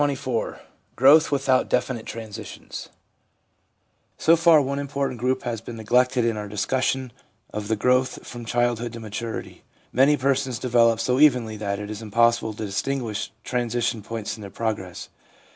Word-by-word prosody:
CHAPTER 145 -1 +2
XXIV 125 -3 -3 0.4
GROWTH 145 +6 +6
WITHOUT 135 -2 +2
DEFINITE 125 -2 0
TRANSITIONS 110 -2 -8 1.3
So 165 - +5
far 165 -1 +6
one 140 0 -1
important 140 -3 -3
group 130 +2 0
has 115 -3 -3
been 115 +1 -8
neglected 125 +2 +2
in 115 -2 0
our 105 0 -4
discussion 130 +4 -1 0.4
of 105 -1 -4
the 110 - +1
growth 125 +3 +1
from 120 -1 -8
childhood 120 0 0
to 115 - -7
maturity. 110 +1 -6 0.3
Many 140 +4 +5
persons 135 -2 0
develop 115 -2 +3
so 125 +3 +1
evenly 125 -7 +4
that 100 -1 -2
it 105 +1 -6
is 105 +1 -6
impossible 115 0 +2
to 110 - -4
distinguish 110 +1 -2
transition 120 -2 -1
points 110 0 -5
in 110 - -12
their 100 - -7
progress. 100 -3 -4
120 Hz, 155 wpm, -24 LUFS, 110-130 Hz, 1.3 s, GROWTH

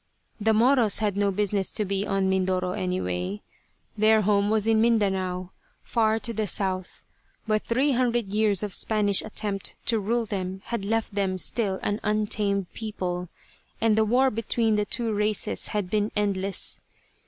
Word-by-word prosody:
The 220 +1 +2
Moros 230 0 +4
had 210 -3 0
no 200 0 +2
business 200 0 0
to 210 - -1
be 200 +1 -2
on 195 -1 +1
Mindoro, 185 -1 0
anyway. 105 - -3 0.5
Their 215 0 +4
home 200 0 +2
was 215 -1 +1
in 225 -1 +3
Mindanao, 190 -5 +1 0.3
far 220 -2 +1
to 225 +2 -5
the 215 -1 -1
south, 185 -1 -3 0.4
but 215 -1 +2
three 265 +5 +1
hundred 240 -5 0
years 210 -2 +2
of 205 -2 -3
Spanish 205 -3 +3
attempt 205 -2 -2
to 225 -2 +1
rule 230 +3 0
them 190 -2 -4
had 235 -4 -3
left 225 0 -1
them 195 -2 0
still 195 0 0
an 205 +1 -1
untamed 210 -2 -1
people, 180 -5 -4 0.5
and 225 -1 +3
the 220 - +4
war 255 +5 +3
between 225 0 0
the 210 0 +1
two 230 +1 -1
races 210 0 0
had 200 -4 -3
been 210 0 +1
endless. 200 -1 -1
210 Hz, 160 wpm, -26 LUFS, 190-220 Hz, 0.5 s, Moros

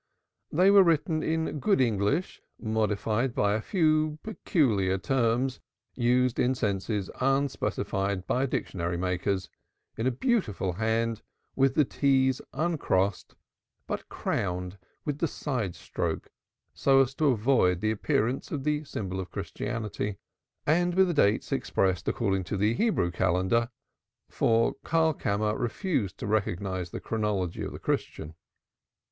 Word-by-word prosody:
They 185 +5 +5
were 200 -1 +8
written 160 -2 +2
in 160 -1 -1
good 200 +5 +2
English 120 - 0 0.2
modified 110 +2 0
by 100 0 +2
a 110 - 0
few 155 - +1
peculiar 110 - +1
terms 125 +4 0 0.3
used 125 0 +2
in 130 +1 +2
senses 100 -2 -2
unsuspected 115 -8 0
by 130 +2 +1
dictionary 90 -7 -2
makers; 95 +1 -1 0.5
in 110 +3 -1
a - - +3
beautiful 120 - 0
hand, 110 +2 0 0.3
with 135 -1 +3
the 150 - +4
t's 130 -1 +2
uncrossed, 105 - 0 0.5
but - - -5
crowned 90 +1 -3 0.3
with 145 -1 -2
the 165 - +1
side 125 - -3
stroke, - - -4 0.4
so 135 -1 +4
as 135 0 0
to 150 +2 +1
avoid 110 -7 +3
the 110 +2 +1
appearance 110 +4 0
of 145 -4 -3
the 150 +1 0
symbol 95 -9 -4
of 95 -2 -5
Christianity, 105 -3 -4 0.5
and 175 +3 +2
with 190 -1 +4
the - - +1
dates 105 -9 +2
expressed 95 -2 0
according 95 -5 0
to 100 - -3
the 105 +3 +2
Hebrew 200 - +1
Calendar, 95 +6 +1 0.6
for 115 0 +2
Karlkammer 110 -10 +1
refused 120 - -1
to - - -5
recognize 95 -3 -1
the - - -6
chronology 105 -6 -2
of - - -4
the - - -7
Christian. 80 +1 -3
115 Hz, 130 wpm, -28 LUFS, 100-140 Hz, 0.6 s, were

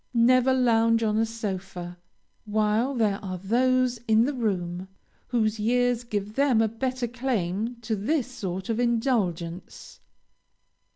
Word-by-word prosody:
Never 250 +2 +4
lounge 230 -3 +3
on 215 -1 +1
a 225 - +2
sofa, 190 -5 -6 0.5
while 215 +5 +1
there 210 -4 0
are 185 -2 -4
those 250 +5 +1
in 220 +1 +4
the 290 - -1
room, 185 -7 -2 0.4
whose 220 -3 0
years 245 +2 +1
give 210 -3 -4
them 270 -2 +3
a 225 - +3
better 255 +2 -2
claim 230 -3 -2
to 225 -1 -2
this 245 +7 0
sort 190 -7 -5
of 230 0 -1
indulgence. 210 -8 -2
225 Hz, 130 wpm, -26 LUFS, 200-245 Hz, 0.5 s, Never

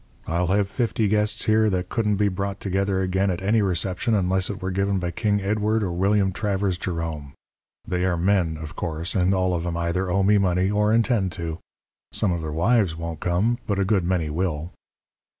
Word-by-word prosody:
I'll 85 +2 0
have 100 +2 +2
fifty 115 0 0
guests 105 +1 +1
here 110 0 +3
that 90 -2 -2
couldn't 105 -3 +1
be 105 +1 +2
brought 100 +1 -3
together 95 0 0
again 95 +2 +1
at 90 -2 -1
any 110 +3 +3
reception 95 +4 0
unless 95 -1 +1
it 100 - -4
were 95 0 -3
given 100 +1 0
by 90 -1 -2
King 105 +1 0
Edward 105 +2 +1
or 95 - -1
William 95 +2 +2
Travers 95 -2 -1
Jerome. 80 -6 -4 0.5
They 90 0 -1
are 90 -2 +1
men, 85 -3 +1
of 80 +2 -8
course, 85 +1 -3
and 90 0 +2
all 95 -1 +1
of 85 -1 -1
'em 85 -1 -2
either 85 +2 -1
owe 95 +2 +2
me 105 +1 +4
money 95 0 +1
or 105 +1 +2
intend 115 -4 +2
to. 85 -2 -5 0.5
Some 100 - +1
of 85 -1 -2
their 80 -1 -4
wives 95 +2 +2
won't 80 -1 -5
come, 100 +8 +1
but 100 - 0
a 100 - +1
good 95 -2 +2
many 85 -3 0
will.' 85 0 -2
95 Hz, 205 wpm, -24 LUFS, 85-105 Hz, 0.5 s, me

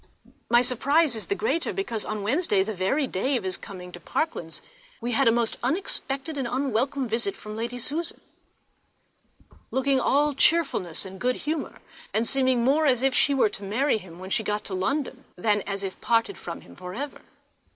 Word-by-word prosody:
My 240 +1 +6
surprize 280 +3 +2
is 220 - -4
the 400 - +1
greater 395 -6 0
because 235 - -2
on 210 -1 -3
Wednesday, 215 - +2
the 220 +2 -4
very 200 +10 +1
day 260 +5 0
of 225 - -5
his 185 -1 0
coming 180 -2 -9
to 175 - -9
Parklands, 170 - -2 0.4
we 240 +1 -2
had 260 +2 +3
a - - +7
most 230 -1 +1
unexpected 285 - 0
and 260 - -1
unwelcome 260 +1 0
visit 225 -3 -1
from 215 0 -8
Lady 235 +2 -3
Susan, 315 +7 -2 1.5
looking 265 0 +2
all 290 +4 +3
cheerfulness 270 - +2
and 190 0 -9
good 250 0 +2
humour, 305 0 -4 0.3
and 225 +2 +2
seeming 260 -3 +3
more 295 +5 +3
as 255 -2 +3
if 270 -1 +4
she 280 +2 +4
were 255 -5 +4
to 200 - -7
marry 220 +5 +1
him 175 -4 -12
when 185 +1 -8
she 230 - +3
got 210 0 -1
to 195 - -5
London 265 +7 -1
than 205 +2 +2
as 200 0 -3
if 190 -1 -5
parted 230 +12 +2
from - - -7
him - - -15
for 180 0 -8
ever. 285 +4 -5
245 Hz, 190 wpm, -26 LUFS, 205-280 Hz, 1.5 s, a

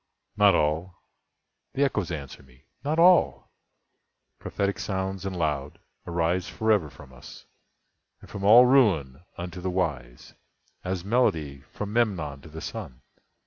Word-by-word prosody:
"Not 100 -3 +5
all"—the 85 - -4
Echoes 105 -10 -1
answer 70 -6 -7
me—"not 70 - -7
all! 175 +2 +4 0.9
Prophetic 100 0 -2
sounds 95 0 -3
and 95 - -5
loud, 75 -4 -2 0.3
arise 85 +2 -1
forever 105 -8 +1
From 70 -1 -15
us, 65 - -13 0.7
and - - -15
from 100 - -8
all 115 +5 +8
Ruin, 90 - +3 0.2
unto 90 0 -7
the 95 - -2
wise, 70 -10 -4 0.5
As 90 -1 -4
melody 80 - 0
from 105 0 -6
Memnon 85 -12 -1
to 80 - -13
the 80 +1 -9
Sun. 60 - -8
90 Hz, 125 wpm, -26 LUFS, 75-105 Hz, 0.9 s, all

